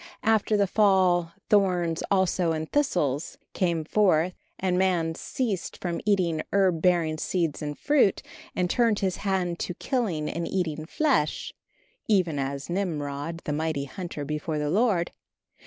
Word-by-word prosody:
After 220 -1 +3
the 200 - +3
fall 185 -4 +3 0.2
"thorns 180 -5 +2
also 185 -3 +2
and 160 0 -3
thistles" 175 - 0 0.2
came 170 -4 0
forth, 180 -2 +3 0.2
and 185 -1 0
man 180 -3 +1
ceased 205 +1 -3
from 175 -2 -3
eating 175 -6 +2
herb 185 -5 +2
bearing 165 -3 +2
seed 165 -5 -1
and 150 -1 -4
fruit, 290 -10 +2 0.3
and 180 - +1
turned 230 +2 +2
his 190 -2 0
hand 185 -4 -1
to 180 - -3
killing 185 - -1
and 170 +2 -3
eating 160 -4 -2
flesh 265 - 0 0.5
"even 180 -8 +2
as 140 0 -3
Nimrod, 165 -3 -3
the 150 - -1
mighty 155 -2 -1
hunter 170 -1 -6
before 150 +1 -3
the 150 0 -1
Lord." 200 -4 +2
175 Hz, 140 wpm, -26 LUFS, 155-195 Hz, 0.5 s, After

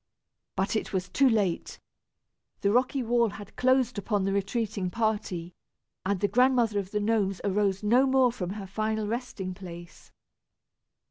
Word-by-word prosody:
But 190 +3 0
it 215 - -2
was 185 -1 -1
too 270 +7 +4
late. 205 -7 0 0.8
The 200 - +2
rocky 255 +3 +2
wall 235 0 +2
had 205 0 -10
closed 255 -3 +2
upon 205 -1 0
the 195 0 0
retreating 200 -1 -1
party, 205 -5 -2 0.5
and 195 0 0
the 205 - +3
Grandmother 245 -3 +3
of 190 -2 -5
the 210 - -1
Gnomes 205 -3 +1
arose 200 0 +1
no 245 +6 +4
more 260 -2 +4
from 185 -7 -4
her 205 -2 -6
final 215 +2 -2
resting 215 -5 -4
place. 175 -2 -11
210 Hz, 150 wpm, -28 LUFS, 195-235 Hz, 0.8 s, too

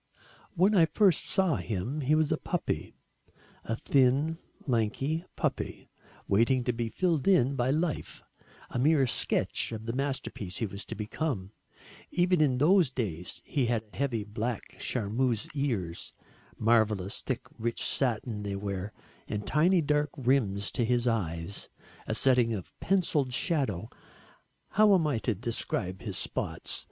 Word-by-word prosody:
When 190 +5 +4
I 170 -5 +6
first 180 +1 +3
saw 190 -7 +2
him, 115 +9 -3
he 145 +3 +3
was 155 -1 +2
a - - +2
puppy - - -3 0.7
a 115 - -2
thin 140 +6 +2 0.3
lanky 135 +7 0
puppy, - - -3 0.4
waiting 115 +5 +3
to 125 - 0
be 115 0 -2
filled 170 0 0
in 140 -8 +4
by 125 0 +1
life, 155 +2 -1 0.5
a - - -2
mere 145 +1 +4
sketch 120 - +1
of 110 -1 -6
the 115 - -2
masterpiece 130 -8 -3
he 115 - 0
was 100 -1 -7
to - - -6
become. 105 -2 -3 0.6
Even 180 -1 +2
in 135 -4 +3
those 170 +2 +5
days 95 -10 -4
he 135 -4 0
had 115 -2 0
heavy 125 -6 -1
black 110 +2 -4
charmeuse 115 0 0
ears, 115 - -2 0.4
marvellous 110 -4 +2
thick - - -2 0.2
rich 115 +1 -1
satin 115 -4 0
they 100 -1 -3
were, 100 0 -4 0.4
and 105 0 -3
tiny 170 +4 +3
dark 150 0 +1
rims 120 -7 +1
to 120 - 0
his 120 +1 +1
eyes 90 -6 -2 0.4
a - - -1
setting 125 -4 +3
of 95 - -8
pencilled 160 -8 +1
shadow. 120 - 0 0.8
How 210 -1 +5
am 170 -4 +2
I 145 -7 +1
to 110 +1 -1
describe 95 -4 -2
his - - -4
spots? - - -1
125 Hz, 145 wpm, -29 LUFS, 110-150 Hz, 0.8 s, I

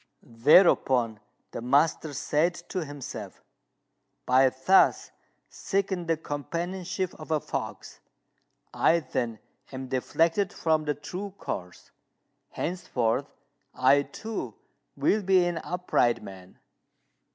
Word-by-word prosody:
Thereupon 120 - +4 0.3
the - - -6
master 145 +5 +2
said 155 +5 +1
to 185 - -2
himself, 145 -3 -8 0.8
"By 130 +1 +5
thus 130 +10 +3 0.4
seeking 190 -3 -2
the 165 -1 +1
companionship 175 +5 -4
of 155 - -10
a 155 -1 +2
fox, - - -6 0.7
I 170 0 +3
then 120 -5 -3 0.3
am 130 -1 -6
deflected 165 +9 +1
from 155 -2 0
the 150 -1 0
true 190 +6 -7
course. 90 0 -7 0.6
Henceforth 125 -10 -1 0.5
I, 130 +2 +5
too, 220 +9 -6 0.4
will 215 - +2
be 190 -2 +4
an 175 -2 -1
upright 120 -10 0
man." 95 -2 -12
155 Hz, 105 wpm, -27 LUFS, 130-180 Hz, 0.8 s, By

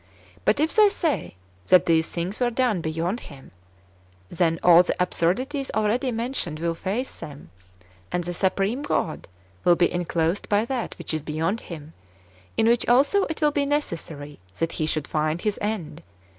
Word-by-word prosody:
But - - +3
if 315 +2 +1
they 425 -2 +7
say 335 - -2 0.3
[that 185 - +6
these 160 -1 +2
things 180 +4 -3
were 245 -1 +2
done] 240 -6 +1
beyond 165 +7 -2
Him, 135 - -13 0.8
then 165 -2 +1
all 175 -1 +8
the 180 - -2
absurdities 250 - 0
already 220 +5 +1
mentioned 230 - -3
will 170 0 0
face 200 +9 -3
them, 140 - -10 0.6
and 180 - -1
the 175 +1 -4
Supreme 195 - 0
God 175 - -2 0.4
will 175 - +5
be 175 - +2
enclosed 175 +1 -1
by 210 +2 +3
that 245 -1 -3
which - - -5
is 155 - -1
beyond 160 +8 -2
Him, 155 -2 -9 0.6
in 220 - +3
which 235 0 +3
also 280 +11 +4
it 320 0 -5
will 300 -1 +4
be 285 -1 0
necessary 165 - -3 0.2
that 165 0 -1
He 155 - -2
should 155 -2 -2
find 155 +1 0
His 210 -2 -1
end. 185 -7 -3
185 Hz, 170 wpm, -24 LUFS, 165-245 Hz, 0.8 s, all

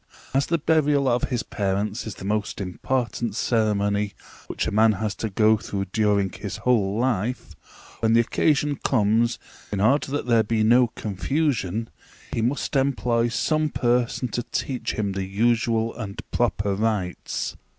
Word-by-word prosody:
As 135 +1 +2
the 170 - +2
burial 150 -3 +2
of 125 -1 +2
his 120 -4 -2
parents 100 +3 -2
is 110 - -5
the - - -9
most 105 +1 -1
important 115 +3 -2
ceremony 105 -3 +1 0.3
which - - -2
a - - -2
man 110 +1 +4
has 105 +1 -2
to 110 - -2
go 110 +2 +4
through 100 -1 -4
during 105 -3 +2
his 100 +1 -6
whole 105 -5 +1
life, 120 0 -1 0.5
when 115 0 +2
the 115 - +6
occasion 145 +4 +1
comes, 115 -1 +2 0.3
in 100 - -2
order 135 +7 +2
that 145 - -2
there 115 -2 +4
be 110 0 0
no 120 +3 +5
confusion, 115 - -1 0.5
he - - 0
must 130 +5 -1
employ 125 -4 +2
some 155 +5 0
person 125 -1 0
to 120 - -2
teach 125 +2 -3
him 100 -2 -1
the 95 0 -3
usual 115 +2 +1
and 100 -5 -6
proper 105 -4 0
rites. 100 -4 -2
115 Hz, 155 wpm, -24 LUFS, 105-125 Hz, 0.5 s, the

